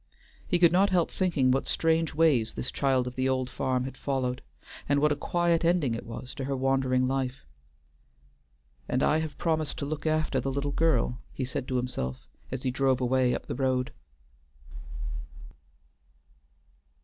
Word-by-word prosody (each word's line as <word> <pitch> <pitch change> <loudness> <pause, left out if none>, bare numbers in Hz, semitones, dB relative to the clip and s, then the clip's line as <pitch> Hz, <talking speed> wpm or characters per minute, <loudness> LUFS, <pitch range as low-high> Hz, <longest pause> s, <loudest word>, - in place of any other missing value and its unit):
He 175 - +3
could 170 -1 +6
not 190 +3 +4
help 180 -3 +2
thinking 155 -9 +2
what 135 +1 +1
strange 165 -1 +1
ways 150 -9 +3
this - - -3
child 135 -3 +1
of 125 - -5
the 130 +1 0
old 130 -1 -1
farm 130 -1 0
had 130 +1 -6
followed, 130 -2 -2 0.5
and 145 0 +4
what 150 +1 +3
a - - +2
quiet 170 +2 +1
ending 165 -7 +2
it 115 - -5
was 120 +2 -7
to 135 - -5
her 135 0 -1
wandering 130 -1 +2
life. 130 0 -2 1.4
"And 130 +2 +1
I 155 - +3
have 155 -3 -4
promised 160 -3 -1
to 140 - -3
look 150 +1 -3
after 155 -3 +1
the 135 - -2
little 140 +1 -2
girl," 145 -4 +1
he 130 - -3
said 130 +1 -4
to 130 - 0
himself 65 - -3 0.2
as 130 0 -4
he 130 - 0
drove 130 0 +2
away 125 0 +2
up - - -6
the - - -4
road. 130 -1 0
135 Hz, 170 wpm, -28 LUFS, 130-155 Hz, 1.4 s, could